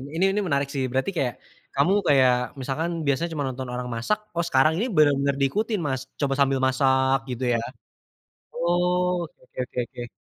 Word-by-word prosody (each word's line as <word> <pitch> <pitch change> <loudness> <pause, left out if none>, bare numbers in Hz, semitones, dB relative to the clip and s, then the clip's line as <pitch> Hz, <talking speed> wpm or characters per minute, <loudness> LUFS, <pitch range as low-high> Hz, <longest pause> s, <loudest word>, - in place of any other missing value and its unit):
ini 170 - +1
ini 205 - 0
menarik 140 -3 +1
sih 135 -2 -1
berarti 130 +7 0
kayak 125 -5 0 0.4
kamu 140 +8 +3
kayak 130 -3 +5 0.3
misalkan 145 +6 -2 0.2
biasanya 140 +5 +1
cuma 145 -2 -2
nonton 130 0 -5
orang 125 0 -4
masak, 120 - 0 0.2
oh 170 - +1
sekarang 145 0 +4
ini 220 - 0
bener-bener 140 -2 +4
diikutin 210 - 0
mas 130 -2 -1 0.2
coba 140 -2 +1
sambil 135 -1 +3
masak 130 0 +3
gitu 125 +1 -4
ya, - - +2 1.0
oh 180 +1 +1
oke 165 - -11
oke - - -32
oke 125 - -5
oke. 120 0 -8
140 Hz, 175 wpm, -25 LUFS, 130-170 Hz, 1.0 s, kayak